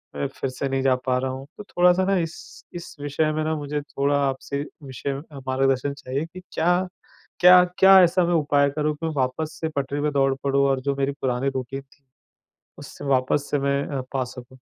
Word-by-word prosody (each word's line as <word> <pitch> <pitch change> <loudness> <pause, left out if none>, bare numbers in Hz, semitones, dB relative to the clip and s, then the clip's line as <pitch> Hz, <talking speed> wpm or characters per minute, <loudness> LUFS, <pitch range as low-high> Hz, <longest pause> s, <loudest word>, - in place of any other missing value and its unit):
मैं 140 - -1
फिर 135 -1 -5
से 130 +2 -3
नहीं 135 0 0
जा 130 -1 +4
पा 125 -1 +2
रहा 130 0 -2
हूँ। 135 +1 -7
तो - - -8
थोड़ा-सा 180 -1 +3
ना 195 0 +2
इस 165 -2 -6
इस 170 - -8
विषय 145 +2 0
में 155 0 -1
ना 160 0 -1
मुझे 145 0 -3
थोड़ा 140 0 -1
आपसे 140 +1 -3 0.2
विषय 135 +1 -4
म 135 - -5
अ, 140 - -9
मार्गदर्शन 135 +1 +1
चाहिए 140 +2 -4
कि 185 +3 -11
क्या 180 +2 +1 0.5
क्या 180 0 +9 0.2
क्या 190 0 +8
ऐसा 180 +1 +3
मैं 175 - +1
उपाय 145 -2 +2
करूँ 150 +1 -1
कि 165 +2 -4
मैं 160 - -2
वापस 150 +4 -2
से 160 - -1
पटरी 140 +1 -2
पर 150 +1 +1
दौड़ 135 -1 +2
पड़ूँ? 140 0 +2
और 135 -1 +1
जो 140 +1 -1
मेरी 140 0 0
पुरानी 130 +1 0
रूटीन 130 +1 -4
थी, 140 +1 -28 0.8
उससे - - -10
वापस 135 +1 +1
से 145 - +1
मैं 140 0 0
अ, 140 -2 -3
पा 130 -2 0
सकूँ? 125 +1 -12
140 Hz, 215 wpm, -24 LUFS, 135-155 Hz, 0.8 s, क्या